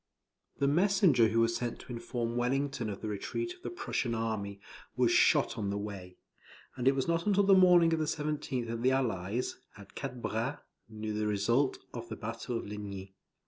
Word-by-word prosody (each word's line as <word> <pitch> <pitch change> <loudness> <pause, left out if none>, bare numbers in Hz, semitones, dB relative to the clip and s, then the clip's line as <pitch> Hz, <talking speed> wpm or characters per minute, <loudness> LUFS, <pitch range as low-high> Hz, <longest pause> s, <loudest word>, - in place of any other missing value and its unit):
The 140 - +2
messenger 175 - +4
who 115 +1 +2
was 115 0 +2
sent 120 0 -3
to 125 - -8
inform 115 0 -3
Wellington 130 -1 0
of 100 - -6
the 110 - -4
retreat 345 - -3
of 360 - -20
the - - -4
Prussian 125 - -2
army, 110 -3 -3 0.4
was - - +3
shot - - +4
on 100 -2 -1
the 100 - -1
way; 100 -3 -7 0.6
and 125 0 -1
it 135 - +5
was 135 - -1
not 170 +3 0
until 200 -1 +4
the 195 0 +6
morning 180 -3 +6
of 160 - +1
the 155 - +1
17th 150 -5 -2
that 115 0 -4
the 125 - +4
Allies, 115 -4 -1 0.2
at 100 -1 -14
Quatre 135 -2 -5
Bras, 120 +3 -2 0.3
knew 110 0 -5
the 105 0 -1
result 115 +7 +2 0.2
of 115 -1 -7
the 110 - -4
battle 115 +2 -4
of - - -5
Ligny. 100 -2 -7
120 Hz, 195 wpm, -31 LUFS, 105-145 Hz, 0.6 s, the